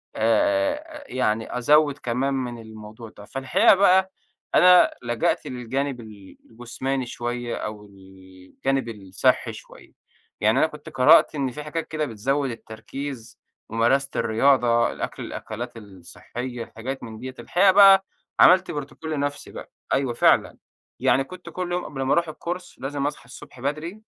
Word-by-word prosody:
آآ، 295 -1 +2
آآ، 305 0 -10
أ - - -16
يعني 115 -2 -1
أزوّد 145 +3 +3
كمان 130 +3 -1
من 125 -3 -3
الموضوع 110 +1 -11
ده، 105 - -11
فالحقيقة 130 - +3
بقى 190 -1 +4 0.4
أنا 180 0 +7
لجأت 120 -1 -1
للجانِب 130 +2 -3
ال 105 -4 -14
الجسماني 125 +3 -4
شوية 120 0 -4
أو 105 0 -6
الجانب 95 +7 -6
الصِحّي 95 -4 0
شوية. - - -14 0.5
يعني - - +3
أنا - - +4
كنت - - -11
قرأت - - +5
إن 135 -3 -1
في 150 +4 -7
حاجات 155 +2 -4
كده 155 -1 -2
بتزوّد 135 +4 -1
التركيز: 115 +3 -8 0.3
ممارسة 125 +5 +1
الرياضة، 120 0 +3
الأكل - - -6
الأكلات 120 +2 -7
الصحيّة 115 +5 -8
حاجات 130 +4 -5
من 110 -2 -9
دِيَّة. 130 +1 -7
الحقيقة 190 +2 +3
بقى 195 0 +7 0.3
عملت 185 +1 +6
بروتوكول 145 +2 -6
لنَفْسي 145 -1 -3
بقى، - - -10 0.2
أيوَه 135 -3 0
فعلًا، 120 - +3 0.4
يعني 130 +2 +3
كنت 180 +5 -11
كُل 180 -1 -5
يوم 180 0 -2
قبل 135 - -6
ما 135 - +1
أروح 170 -1 +1
الCourse 175 +3 -6
لازم 140 +1 -3
أصحى 145 - -6
الصبح 125 +1 -13
بدري، 155 - -4
130 Hz, 145 wpm, -24 LUFS, 115-150 Hz, 0.5 s, أنا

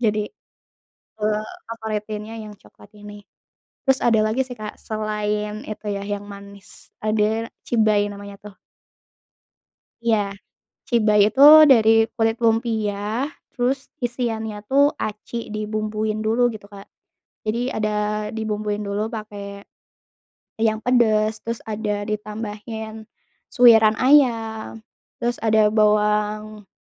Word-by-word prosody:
jadi, 210 -1 +1 0.9
eee, 215 0 0 0.2
favoritinnya 215 -1 -5
yang 210 -1 -10
coklat 200 - -19
ini. 205 0 -11 0.7
Terus 265 0 +4
ada 230 -2 +4
lagi 220 +5 0
sih 255 - -9
Kak 215 -2 -8
selain 210 0 -3
itu 215 0 -8
ya 200 0 -3
yang 205 0 -5
manis, 200 0 -13
ada 215 +1 0 0.2
cibay 215 -3 +2
namanya 200 0 -10
tuh. 205 -1 -13 1.5
Iya, 225 -2 +3 0.7
cibay 215 -3 +3
itu 270 - -1 0.3
dari 220 -4 +6 0.3
kulit 225 0 +2
lumpia 225 -2 +1 0.6
terus 255 +2 0 0.3
isiannya 225 -3 -3
tuh 275 +1 +5 0.2
aci 215 +2 -7 0.2
dibumbuin 215 0 -2
dulu 225 +3 +1
gitu 210 -2 -10
Kak. 195 0 -11 0.6
Jadi 215 +2 -1 0.2
ada 215 -1 -1 0.5
dibumbuin 210 -1 -2
dulu 200 +1 -2
pakai 215 -3 -7 1.2
yang 220 -1 +1
pedes, 220 -3 +3
terus 230 0 -4
ada 210 -1 -3
ditambahin 215 +1 -6 0.5
suwiran 225 -3 +7
ayam, 225 -5 +2 0.3
terus 240 0 -2
ada 215 -1 +3
bawang 210 -1 +1
215 Hz, 110 wpm, -22 LUFS, 210-225 Hz, 1.5 s, suwiran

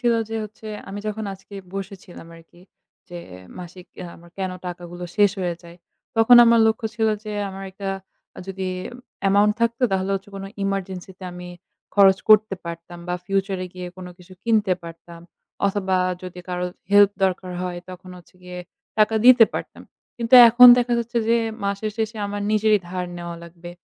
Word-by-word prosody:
ছিল 240 -2 +2 0.2
যে 225 - -3
হচ্ছে 215 +1 -13 0.2
আমি 200 +1 -6
যখন 215 +1 -4
আজকে 195 +1 -16 0.2
বসেছিলাম 190 -3 -8
আরকি 165 +1 -19 0.5
যে 175 0 -8 0.4
মাসিক 180 +1 -11
অ্যা 180 - -6
আমার 170 0 -18
কেনো 185 -1 -3
টাকাগুলো 175 0 -7
শেষ 205 -2 +5
হয়ে 175 -2 -2
যায়। 170 0 -14 0.4
তখন 225 +2 +7
আমার 230 -1 +5
লক্ষ্য 220 0 0
ছিল 220 -1 +1 0.2
যে 210 - -5 0.2
আমার 195 0 -8
একটা 195 +1 -5 0.6
যদি 190 -1 -4 0.6
amount 205 +2 +4
থাকতো 235 +2 0
তাহলে 190 +1 -1
হচ্ছে 195 +1 -6
কোনো 195 0 -7 0.2
emergency 190 -2 -4
তে 185 - -10
আমি 180 0 -9 0.5
খরচ 195 -2 +6
করতে 215 -2 +5
পারতাম 170 +1 -8
বা 180 - -1
future 195 -1 -1
এ - - -6
গিয়ে 180 0 -7
কোনো 180 -1 -9
কিছু 180 +1 -16
কিনতে 215 -4 +2
পারতাম 170 0 -12 0.5
অথবা 190 -2 0 0.3
যদি 180 -1 -9
কারো 180 0 -3 0.3
help 205 -1 +7
দরকার 185 -1 -2
হয় 180 -1 -4
তখন 185 0 -11
হচ্ছে 175 - -20
গিয়ে 180 0 -9 0.4
টাকা 215 +1 +3
দিতে 250 -2 +8
পারতাম। - - -6 0.3
কিন্তু 235 +1 +2
এখন 245 +2 +8
দেখা 245 0 0
যাচ্ছে 235 +1 -2
যে 235 - +4 0.3
মাসের 200 +2 -2
শেষে 225 0 -3
আমার 205 0 -4
নিজেরই 215 0 +3
ধার 180 0 -4
নেওয়া 170 0 -7
লাগবে। 170 +1 -12
195 Hz, 170 wpm, -22 LUFS, 180-215 Hz, 0.6 s, দিতে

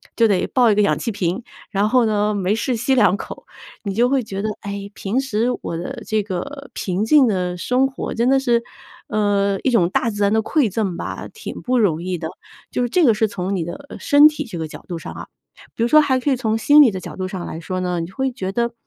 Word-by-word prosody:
就 230 -1 +4
得 195 -3 +1
抱 245 -3 +3
一 - - +2
个 210 - +3
氧 200 - +2
气 230 - -3
瓶。 190 +3 -2 0.3
然 205 +1 +1
后 245 0 +3
呢， 210 -1 +1
没 200 +1 0
事 250 +2 -1
吸 245 +4 0
两 200 -5 +4
口， - - -9 0.4
你 200 -2 -3
就 240 +4 +3
会 270 -1 +2
觉 195 -2 -5
得： 215 - -1
“哎， 200 0 -6
平 205 +6 -2
时 230 -3 -1
我 165 - -4
的 235 +8 -6
这 215 -1 0
个， 270 +9 -6
平 190 +3 -2
静 290 +2 +6
的 180 -3 -1
生 255 +8 +1
活 265 - -5
真 235 +2 +1
的 270 - +5
是， 240 -3 +1 0.4
呃， 200 -2 +1
一 - - +2
种 180 -7 +3
大 230 - 0
自 205 -1 -5
然 200 +1 +3
的 220 - +3
馈 285 -4 +1
赠 195 -5 -2
吧， - - -5
挺 445 - -8
不 255 0 0
容 170 -7 +2
易 185 -1 -2
的。” 160 -1 -4 0.4
就 - - -1
是 245 - 0
这 345 +3 +3
个 230 - +5
是 215 +1 +1
从 190 0 -3
你 175 - -1
的 175 - -8
身 290 +1 +6
体 300 0 -2
这 185 - -7
个 160 -1 -3
角 - - -11
度 175 - -3
上 - - -8
啊。 - - -8 0.5
比 230 - -1
如 - - +3
说 305 +4 +6
还 265 -3 +2
可 280 +2 0
以 - - +3
从 225 -3 -1
心 290 +6 +6
理 250 - +6
的 190 - -5
角 - - -8
度 185 0 -3
上 185 -2 -5
来 160 - -6
说 185 +2 -4
呢， 180 -1 -1
你 165 +1 -4
会 265 +6 -2
觉 190 -6 -4
得： 235 +1 0
215 Hz, 275 characters per minute, -20 LUFS, 190-250 Hz, 0.5 s, 静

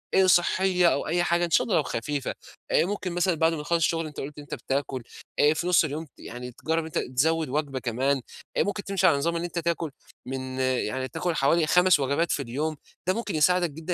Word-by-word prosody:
آآ 190 0 +5
صحية 180 0 +4
أو - - -2
أي 175 +2 +1
حاجة 175 0 +2
إن - - -5
شا - - +4
الله 210 - 0
لو 150 - +3
خفيفة، 140 +3 -3 0.4
آآ - - +4
ممكن 190 -2 -3
مثلًا 175 0 +1
بعد 160 +1 +2
ما 150 - -3
نخلص 170 +3 +1
الشغل 165 0 +1
أنت 150 - -9
قُلت 145 +2 -6
أنت 145 0 -9
بتاكل، 135 -1 -3 0.4
آآ 150 +1 +5
في 170 +3 -3
نص 180 -2 +5
اليوم 155 +2 -3
ت - - -25
يعني 125 +1 -8
تجرب 160 +7 -1
إن 160 - -4
أنت 160 - -4 0.2
تزود 160 +1 +2
وجبة 140 -2 -2
كمان، 130 +3 0 0.4
آآ - - +4
ممكن 205 0 -3
تمشي 195 -1 +2
على 145 - +4
نظام 170 +4 0
إن 170 - -2
أنت 170 -1 -3
تاكل 165 -2 -1 0.3
من 130 0 -5
يعني 130 0 0
تاكل 160 +5 -2
حوالي 155 +3 +3
5 180 -3 +5
وجبات 140 +5 0
في 140 - 0
اليوم، 145 +6 -2 0.3
ده 185 - +3
ممكن 210 -5 -3
يساعدك 175 +2 +3
جدًا 160 +4 -4
160 Hz, 230 wpm, -26 LUFS, 140-175 Hz, 0.4 s, آآ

